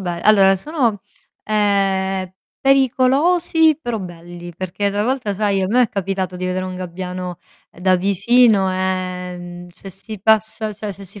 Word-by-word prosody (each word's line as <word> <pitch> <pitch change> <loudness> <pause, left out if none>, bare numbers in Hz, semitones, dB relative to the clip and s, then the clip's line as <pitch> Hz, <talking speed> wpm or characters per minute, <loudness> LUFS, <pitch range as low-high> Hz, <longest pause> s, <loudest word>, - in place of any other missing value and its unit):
be 175 -2 -4
allora 195 -2 +5
sono, 240 - -1 0.4
ehm, 195 -3 0 0.3
pericolosi, 280 +5 +3
però 240 -5 -3
belli, 175 -1 -9
perché 185 +3 -2
travolta 215 +2 -1
sai, 200 -1 0
a 190 - 0
me 245 +6 +3
è 235 - +1
capitato 190 -2 -3
di 180 - -5
vedere 185 0 -2
un 185 0 -5
gabbiano, 180 0 -6 0.3
ehm, - - -17
da 185 0 +4
vicino, 200 +1 +3
e, 185 -1 -3
mhmm, 175 0 -9
se 195 +2 -10
si 200 +2 -9
passa 220 +1 +1
cioè 210 0 -6
se 195 +1 -9
si 200 +2 -6
195 Hz, 155 wpm, -19 LUFS, 185-220 Hz, 0.4 s, allora